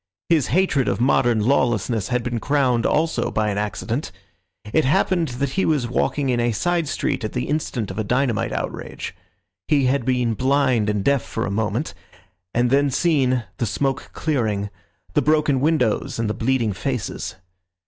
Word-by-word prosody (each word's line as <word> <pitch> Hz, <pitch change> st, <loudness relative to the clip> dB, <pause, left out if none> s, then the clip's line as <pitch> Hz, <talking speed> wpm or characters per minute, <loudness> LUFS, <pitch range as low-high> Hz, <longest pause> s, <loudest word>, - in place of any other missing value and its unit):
His 160 Hz, -5 st, +3 dB
hatred 150 Hz, -5 st, +2 dB
of 100 Hz, -, 0 dB
modern 120 Hz, -3 st, +3 dB
lawlessness 120 Hz, -3 st, +1 dB
had 125 Hz, -1 st, 0 dB
been 120 Hz, -1 st, -2 dB
crowned 130 Hz, -3 st, +2 dB
also 160 Hz, +2 st, +1 dB
by 105 Hz, -1 st, 0 dB
an 100 Hz, -, -2 dB
accident. 105 Hz, +6 st, -3 dB, 0.6 s
It 155 Hz, -, +4 dB
happened 165 Hz, +5 st, +2 dB
that 140 Hz, 0 st, -1 dB
he 190 Hz, -, 0 dB
was 145 Hz, -6 st, +1 dB
walking 135 Hz, +3 st, 0 dB
in 120 Hz, -1 st, +1 dB
a 120 Hz, 0 st, +1 dB
side 175 Hz, +6 st, 0 dB
street 135 Hz, -, -1 dB
at 110 Hz, -, -3 dB
the 125 Hz, -, -1 dB
instant 130 Hz, -9 st, -2 dB
of 95 Hz, -, -5 dB
a -, -, +1 dB
dynamite 125 Hz, 0 st, 0 dB
outrage. -, -, -5 dB, 0.5 s
He 145 Hz, -3 st, +3 dB
had 130 Hz, +1 st, +1 dB
been 125 Hz, -2 st, +1 dB
blind 130 Hz, -3 st, +2 dB
and 105 Hz, -2 st, 0 dB
deaf 140 Hz, +1 st, +3 dB
for 115 Hz, -, -4 dB
a 100 Hz, -, -3 dB
moment, 110 Hz, +7 st, -1 dB, 0.6 s
and 120 Hz, +1 st, +1 dB
then 140 Hz, +1 st, +4 dB
seen, 135 Hz, -4 st, +2 dB
the 115 Hz, -, -1 dB
smoke 135 Hz, +5 st, -1 dB
clearing, 110 Hz, -10 st, -1 dB, 0.4 s
the -, -, +3 dB
broken 150 Hz, -3 st, +2 dB
windows 145 Hz, -8 st, +1 dB
and 115 Hz, -1 st, -1 dB
the 105 Hz, -, -1 dB
bleeding 115 Hz, -3 st, 0 dB
faces. 125 Hz, +2 st, -3 dB
125 Hz, 170 wpm, -22 LUFS, 115-140 Hz, 0.6 s, It